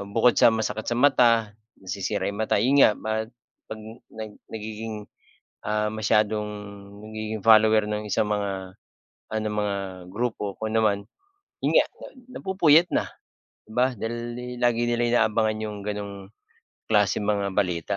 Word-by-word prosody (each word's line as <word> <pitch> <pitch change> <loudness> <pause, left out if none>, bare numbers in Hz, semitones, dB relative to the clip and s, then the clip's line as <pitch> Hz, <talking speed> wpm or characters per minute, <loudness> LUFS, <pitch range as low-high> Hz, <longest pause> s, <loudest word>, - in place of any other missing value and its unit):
ah, - - -5
bukod 115 +4 +3
sa 115 - +6
masakit 110 -1 -2
sa 120 - 0
mata, 115 -6 +4 0.2
nasisira 95 +2 -3
yung 100 +2 -5
mata. 110 -2 +1
'Yun 130 +6 +3
nga 120 - +8
ba 110 - -6 0.6
'pag 110 - -7 0.3
nag 110 -1 -7 0.2
nagiging, 110 -1 -6 0.6
ah, 105 0 0
masyadong 110 -1 +1 0.6
nagiging 110 -1 -5
follower 110 -1 +6
ng 105 0 -3
isang 105 +1 0
mga, 100 -1 0 0.8
ano 110 0 -2
mga 105 -1 -1 0.3
grupo, 105 -2 -3
kung 110 0 -3
ano 115 - +3
man. 100 -2 +2 0.6
Yun - - +3
nga, - - +3 0.5
napupuyat 180 - +4
na - - +1 0.6
di 110 - -13
ba 125 +1 +3
dahil 120 +2 -4 0.2
lagi 120 0 +2
nila 120 0 +2
inaabangan 110 0 0
'yung 105 -1 -4
ganong 100 -1 -6 0.6
klaseng 105 -1 +3
mga 100 -2 -1
balita. 90 -1 0
110 Hz, 145 wpm, -25 LUFS, 105-115 Hz, 0.8 s, nga